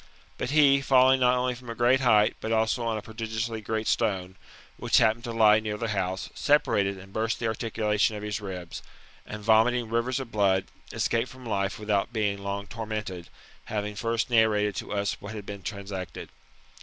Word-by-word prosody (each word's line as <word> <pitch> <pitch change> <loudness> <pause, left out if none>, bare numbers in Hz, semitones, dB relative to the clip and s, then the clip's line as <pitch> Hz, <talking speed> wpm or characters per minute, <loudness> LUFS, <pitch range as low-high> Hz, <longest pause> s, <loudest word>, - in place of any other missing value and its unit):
But - - -2
he, 140 -2 +5
falling 130 -1 +5
not 125 0 +4
only 125 0 0
from 120 0 -12
a 115 - -5
great 120 +3 +3
height, 110 -5 +4
but 110 - -4
also 110 +2 +1
on 115 -1 -1
a 105 - -6
prodigiously 110 0 -4
great 110 +1 -3
stone, 95 -5 0 0.4
which - - +2
happened 110 +2 +3
to 120 - -4
lie 110 -2 +5
near 105 -1 -4
the 115 +1 -3
house, 95 -2 -2
separated 100 -9 +2
and 95 +1 -13
burst 110 +1 -1
the 115 - -4
articulation 110 -1 0
of 105 - -6
his 105 +1 -3
ribs, 90 -4 -7 0.5
and, 105 0 -7
vomiting 115 +2 +3
rivers 120 +3 0
of 130 -3 -7
blood, 95 -3 +2 0.3
escaped 115 +2 0
from 130 -1 -13
life 100 -1 -1
without 105 0 -1
being 105 -3 -1
long 100 0 -4
tormented, 105 -5 -5 0.4
having 105 -1 -3
first 115 +3 -2
narrated 105 -3 +3
to - - -5
us 100 -1 -1
what 105 +2 -7
had 105 -2 -7
been 100 -1 -7
transacted. 100 -4 -6
110 Hz, 185 wpm, -27 LUFS, 100-115 Hz, 0.5 s, he